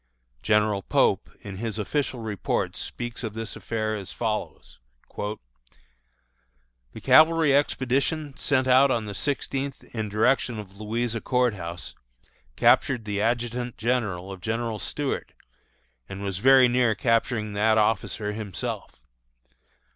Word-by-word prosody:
General 105 -1 +2
Pope, - - +2
in 100 -2 -8
his 110 0 -4
official 130 +3 -2
reports, 105 -4 -2
speaks 120 +1 -6
of 110 -2 -4
this 115 0 -5
affair 110 -1 -2
as 100 -3 -7
follows: 110 -2 -4 0.4
"The 105 +1 -3 1.7
cavalry 160 -2 +6
expedition 140 +1 0
sent 130 -2 +1
out 130 +2 +6
on 115 -4 0
the 105 - -6
sixteenth 140 +2 -2
in 110 -2 -2
the - - -13
direction 115 +2 +2
of 100 -1 -9
Louisa 115 +1 -2
Court 125 -3 +2
House, 85 -2 -7 0.6
captured 125 -4 +3
the 100 -1 -2
adjutant 120 +1 -1
general 105 -6 -1
of 95 -2 -9
General 115 0 -2
Stuart, 145 +4 -3 0.8
and 95 +1 -6
was 95 -2 -3
very 130 +2 +7
near 120 -2 +2
capturing 115 0 0
that 110 +2 +3
officer 105 0 0
himself. 105 -3 -5
115 Hz, 125 wpm, -25 LUFS, 105-125 Hz, 1.7 s, very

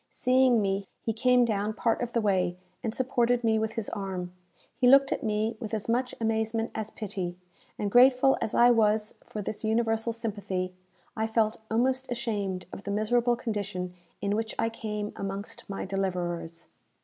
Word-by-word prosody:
Seeing 255 -3 +3
me, 195 0 -1 0.2
he 225 - 0
came 250 +2 +4
down 210 -1 -1
part 230 0 +1
of 240 -1 -3
the 235 - +2
way, 185 -4 +1 0.3
and 225 - -1
supported 245 -1 +1
me 220 -1 +3
with 220 0 -1
his 225 -3 -3
arm. 185 -4 -4 0.4
He 250 - +3
looked 275 +1 +7
at - - -1
me 215 -1 0
with 220 -2 -3
as 215 - -4
much 250 +2 0
amazement 225 0 0
as 220 -1 -4
pity, 185 -5 -5 0.4
and, 205 -1 -2
grateful 255 +2 +6
as 215 - -2
I 240 +1 +7
was 215 -2 +2
for 210 - -6
this 215 - -5
universal 225 +1 +1
sympathy, 200 -5 -3 0.4
I 220 0 0
felt 220 -1 +1
almost 260 +3 +1
ashamed 205 -7 -2
of - - -6
the 200 - -7
miserable 240 +4 +2
condition 205 -6 -3 0.3
in 200 +1 0
which 220 0 -2
I 225 - +1
came 210 -2 -4
amongst 195 +1 -6
my 195 - -4
deliverers. 175 -3 -3
220 Hz, 175 wpm, -28 LUFS, 200-235 Hz, 0.4 s, looked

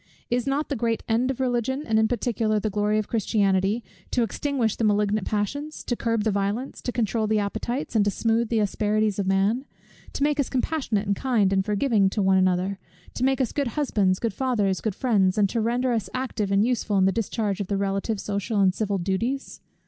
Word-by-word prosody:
Is 245 +1 0
it - - +2
not 285 +3 -1
the 285 - -1
great 230 -1 -1
end 235 +3 +1
of 265 - -3
Religion, 260 +2 0
and 220 -1 +2
in 220 - +3
particular 225 -3 0
the 215 0 -2
glory 210 +1 +1
of 215 - -1
Christianity, 205 -1 +1 0.3
to 245 - +1
extinguish 245 -2 -1
the - - -3
malignant 210 -1 +1
passions; 285 +9 -3
to 240 - -1
curb 230 -2 0
the 220 - +1
violence, 205 +6 -2
to 245 - -3
controul 225 -2 0
the 215 0 +2
appetites, 220 +6 -3
and 215 - +5
to - - +3
smooth 225 +2 0
the 230 - +1
asperities 210 0 0
of 195 - -1
man; 195 +6 +2 0.5
to - - -1
make 295 0 +1
us 280 - +1
compassionate 255 -6 -1
and 200 0 +1
kind, 215 -5 +1
and 190 0 +1
forgiving 210 0 +2
one 190 -3 +3
to - - +5
another; 185 +1 +1 0.3
to 250 - -3
make 265 +1 +2
us 255 -4 0
good 285 -2 -1
husbands, 205 -10 +2
good 230 -1 -2
fathers, 210 -8 0
good 215 -4 -2
friends, 200 -7 +2
and 200 -2 +3
to 230 - -1
render 245 +3 +1
us 220 -5 -1
active 240 -6 -2
and 200 +2 +3
useful 230 -4 0
in 190 - +4
the 195 - +4
discharge 210 -2 -2
of 195 - -3
the 200 - -1
relative, 195 +2 -1
social, 200 +2 -2
and 190 -2 +4
civil 205 -1 -1
duties? 220 +9 -2
215 Hz, 215 wpm, -25 LUFS, 200-245 Hz, 0.5 s, and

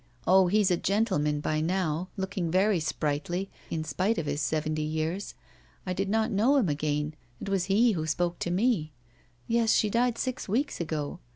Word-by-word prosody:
Oh, 190 0 +5
he's 205 0 +3
a 175 - +3
gentleman 150 -8 +1
by 155 +1 0
now, 175 0 -1
looking 190 -3 -2
very 190 +2 +3
sprightly, 160 +4 -2 0.2
in 160 -1 -2
spite 195 +7 0
of 160 - -2
his 145 +1 -2
seventy 155 +1 -1
years. 160 +5 -3 0.5
I 185 - -1
did 195 +2 -2
not 220 +2 +1
know 225 +8 +3
him 240 - +3
again. 150 0 -1 0.3
It - - -5
was 195 -2 +1
he 215 +5 +4
who 160 -5 -2
spoke 175 +2 -1
to - - -2
me. 180 -5 +1 0.5
Yes, 230 -1 +3
she 210 - +2
died 235 +1 +1
six 255 -5 -3
weeks 250 +1 0
ago. 155 0 -3
180 Hz, 180 wpm, -28 LUFS, 155-205 Hz, 0.5 s, Oh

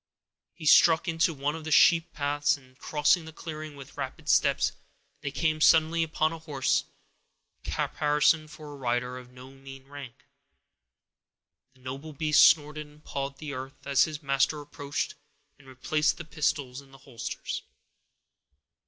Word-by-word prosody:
He 160 - -10
struck 160 +2 +6
into 165 0 +2
one 145 -1 -2
of 160 - -8
the 155 - -5
sheep 165 +2 +5
paths, 145 0 0
and, 130 -2 -21
crossing 155 +2 +2
the 160 - -9
clearing 155 -1 -8
with 135 -2 -13
rapid - - -6
steps, - - +3 0.5
they 145 - -3
came 155 +2 -1
suddenly 160 +1 +5
upon 160 0 0
a 165 - -7
horse, 145 -5 0 0.8
caparisoned 150 +1 +1
for 150 -1 -10
a - - -10
rider 125 0 -2
of 125 -1 -14
no 125 +1 -13
mean 135 0 -13
rank. 140 -4 -11 1.5
The 130 - -24
noble 135 +5 -7
beast 150 +1 +4
snorted 150 -1 +3
and 150 +1 -20
pawed 140 0 -5
the 150 -1 -7
earth, 135 +1 -8
as 140 -1 +4
his 155 -1 -7
master 140 +2 +1
approached 145 0 -4 0.5
and 135 - -19
replaced 150 +5 0
the 170 - -8
pistols 150 -4 -2
in 140 - -20
the 135 - -15
holsters. 125 -4 -5
145 Hz, 155 wpm, -28 LUFS, 135-155 Hz, 1.5 s, struck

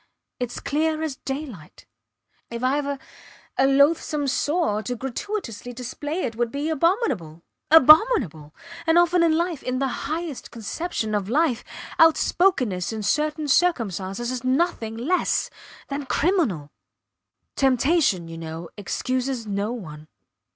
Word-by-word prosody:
Its 245 -1 -3
clear 315 +2 0
as 295 -4 -3
daylight. 265 - -7 0.6
If 235 +1 -6
Ive 280 +2 +1
a 280 -1 -3 0.6
a 265 - +3
loathsome 290 +1 +3
sore, 290 -5 0
to 245 +3 -4
gratuitously 250 - -5
display 290 +7 -4
it 230 -4 -3
would 235 0 -1
be 290 +3 -2
abominable 300 - 0 0.3
abominable! 300 - +5 0.3
And 325 +1 +4
often 345 0 +4
in 325 -2 +3
life 340 -4 -1
in 255 0 -2
the 270 0 -2
highest 320 -3 -4
conception 230 - -4
of 205 -1 -1
life 270 -2 +1 0.4
outspokenness 320 - +3
in 220 -1 -4
certain 300 +6 0
circumstances 235 - 0
is 255 -1 -4
nothing 255 -5 0
less 320 +11 0 0.4
than 280 -1 -4
criminal. 255 - 0 0.8
Temptation, 265 - +2
you 165 0 -8
know, 165 +1 -7
excuses 255 +4 -2
no 205 +1 -2
one. 155 -10 -8
265 Hz, 125 wpm, -24 LUFS, 220-315 Hz, 0.8 s, abominable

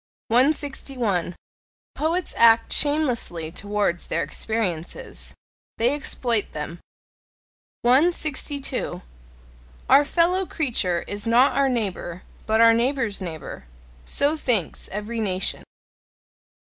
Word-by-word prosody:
161. 250 - 0 0.6
Poets 330 +3 -1
act 230 0 +5
shamelessly 250 - +1
towards 205 -2 -2
their - - -1
experiences: 190 -7 -4 0.4
they 240 +4 +2
exploit 245 -6 -1
them. 155 +3 -6 1.0
162. 280 - 0 0.8
"Our 275 +2 +7
fellow 350 +5 +2
creature 215 - 0
is 205 +2 -4
not 245 +3 +4
our 275 0 +3
neighbour, 190 -7 -3 0.2
but 220 0 +2
our 230 0 +7
neighbour's 235 -3 0
neighbour": 160 - -7 0.4
so 290 +2 +2
thinks 235 - 0
every 210 +3 -4
nation. 190 -3 -2
230 Hz, 95 wpm, -23 LUFS, 195-280 Hz, 1.0 s, Our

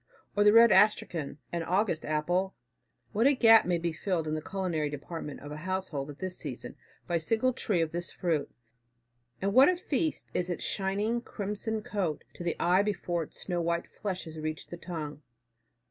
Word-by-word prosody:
Or 205 - +4
the 210 - +7
red 230 0 +8
astrachan, 170 -9 +3
an 170 - -1
August 180 0 0
apple, 175 +5 0 0.6
what 225 +5 +3
a 285 - +4
gap 225 -3 +7
may 175 -1 +2
be 170 0 -2
filled 165 -1 -1
in 155 - -1
the 155 - -2
culinary 175 -5 -2
department 150 +1 -6
of 145 - -8
a 150 - -5
household 170 -5 -3
at 145 - -8
this 185 +1 -4
season, 140 -6 -6 0.3
by 170 - +1
a - - -1
single 225 +10 +1
tree 205 -7 0
of 160 -1 0
this 175 +1 -4
fruit! 160 -5 -1 0.9
And 200 0 +1
what 265 +6 +8
a 365 - +1
feast 315 -3 -1
is 180 0 -1
its 175 - -3
shining 205 +4 0
crimson 210 0 -3
coat 185 -9 -2
to - - -8
the 170 - -1
eye 180 +3 +4
before 180 -4 -1
its 160 - -8
snow 175 -2 -1
white 170 0 0
flesh 190 -3 -4
has 160 -2 -8
reached 155 0 -5
the 175 - -5
tongue. 160 -4 -6
180 Hz, 190 wpm, -30 LUFS, 160-210 Hz, 0.9 s, red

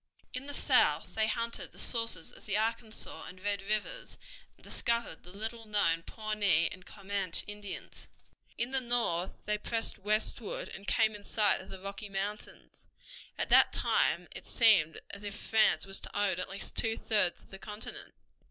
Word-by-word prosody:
In 255 +2 -4
the 285 - -4
south - - +4
they 220 0 +2
hunted 230 0 -2
the - - -17
sources 230 -8 0
of - - -15
the 205 -1 +2
Arkansas 220 0 -2
and 185 - -9
Red 200 +1 -1
Rivers, 215 - -2 0.4
and - - -23
discovered 235 -8 -1
the 175 - -12
little 225 +3 -4
known 165 -6 +3
Pawnee 205 -5 +1
and 185 - -10
Comanche 195 -3 0
Indians. 205 -1 -8 0.5
In 240 +2 -1
the 265 -1 +4
north 235 -8 0
they 210 0 0
pressed 225 -1 -3
westward 215 +2 -1
and 195 - -10
came 220 -1 +3
in 205 -1 -10
sight 210 0 +2
of 190 - -13
the 190 - -8
Rocky 200 +2 -6
Mountains. 200 +2 -5 0.5
At - - -1
that - - +7
time - - +2
it - - -10
seemed 200 -9 +4
as 200 - -8
if 205 -1 -5
France 220 0 +3
was 195 0 -4
to - - -7
own 195 -3 +2
at - - -4
least 195 0 -7
two 225 -1 0
thirds 205 -6 +1
of - - -22
the 195 - -9
continent. 210 +2 -6
210 Hz, 175 wpm, -32 LUFS, 195-225 Hz, 0.5 s, that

